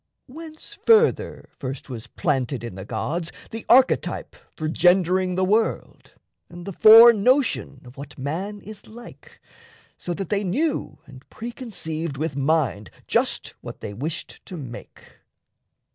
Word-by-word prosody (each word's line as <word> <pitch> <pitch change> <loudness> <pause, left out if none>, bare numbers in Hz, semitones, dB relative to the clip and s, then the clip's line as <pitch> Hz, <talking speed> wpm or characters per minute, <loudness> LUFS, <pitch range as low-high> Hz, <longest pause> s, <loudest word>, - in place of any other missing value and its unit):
Whence, 315 +6 -10
further, 445 +2 +2
first 135 -1 -6
was 120 -4 -8
planted 130 -2 -2
in 115 - -6
the 95 +1 -8
gods 165 +10 -3 0.2
The 225 0 -7
archetype 260 +2 +3 0.2
for 155 - -3
gendering 180 +2 +2
the 185 +1 +1
world 215 +4 -1 0.4
And 175 0 -10
the 195 - -6
fore 225 +5 +9
notion 235 - +1
of 125 +1 -14
what 140 +1 -10
man 180 +10 -4
is 215 +1 -11
like, 235 +2 -14 0.6
So 175 - -4
that 195 -2 -5
they 205 0 0
knew 285 - -1
and 135 -2 -14
pre 235 +2 -7
conceived 165 - -5
with 155 -1 -3
mind 140 - 0 0.2
Just - - 0
what - - -10
they 105 - -6
wished 150 +10 -6
to 180 - -7
make? 130 -6 -11
175 Hz, 145 wpm, -23 LUFS, 140-225 Hz, 0.6 s, fore